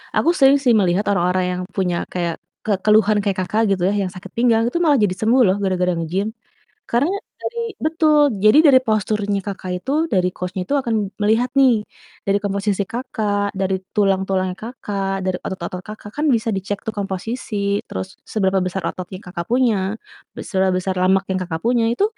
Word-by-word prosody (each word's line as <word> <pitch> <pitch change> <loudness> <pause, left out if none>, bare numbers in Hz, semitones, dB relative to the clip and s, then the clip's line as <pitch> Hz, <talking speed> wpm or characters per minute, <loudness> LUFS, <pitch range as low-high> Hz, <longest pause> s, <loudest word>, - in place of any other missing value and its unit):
aku - - +3
sering 275 +1 +6
sih 245 -3 +4
melihat 190 +1 +1
orang-orang 185 -1 +1
yang 180 - -3
punya 180 -3 0 0.2
kayak 170 -2 -1 0.3
ke 215 - 0
keluhan 215 0 +4
kayak 200 -2 -1
Kakak 210 +5 0
gitu 185 -2 0
ya, - - 0
yang 185 - -3
sakit 185 +1 -10
pinggang 230 -2 +3
itu 295 - -1
malah 295 -3 +4
jadi 185 -3 +1
sembuh 240 +4 +4
loh 185 - +3
gara-gara 180 -1 +1
nge-gym, 170 +5 -2 0.6
karena 275 +10 +2 0.3
dari 470 - -4 0.2
betul 315 -1 +2 0.3
jadi 215 +6 +6
dari 260 -2 +7
posturnya 210 -1 0
Kakak 190 -2 -5
itu 265 +9 -5 0.2
dari 180 -1 +3
coach-nya 180 +1 -4
itu - - -1
akan 235 -3 -1 0.3
melihat 225 +4 +2
nih, 245 -6 +4 0.4
dari 195 - +3
komposisi 200 0 0
Kakak 210 -5 -2
dari 190 0 +1 0.2
tulang-tulangnya 190 -2 +1
Kakak 200 -4 -4
dari 185 -1 0
otot-otot 180 -1 -5
Kakak 210 -1 -9
kan 305 - 0
bisa 225 0 -1
dicek 195 +1 -3
tuh 220 - 0
komposisi 200 +1 -2
terus 95 0 -6
seberapa 195 -2 +1
besar 185 +1 -3
otot 185 - -6
yang 185 - -8
Kakak 170 -1 -5
punya, 220 -6 +2 0.4
be - - -6
seberapa 190 -2 +1
besar 185 +1 -2
lemak 190 +1 +3
yang 185 - 0
Kakak 165 -2 -4
punya 235 -1 +2
itu, 315 - 0
200 Hz, 180 wpm, -20 LUFS, 185-225 Hz, 0.6 s, dari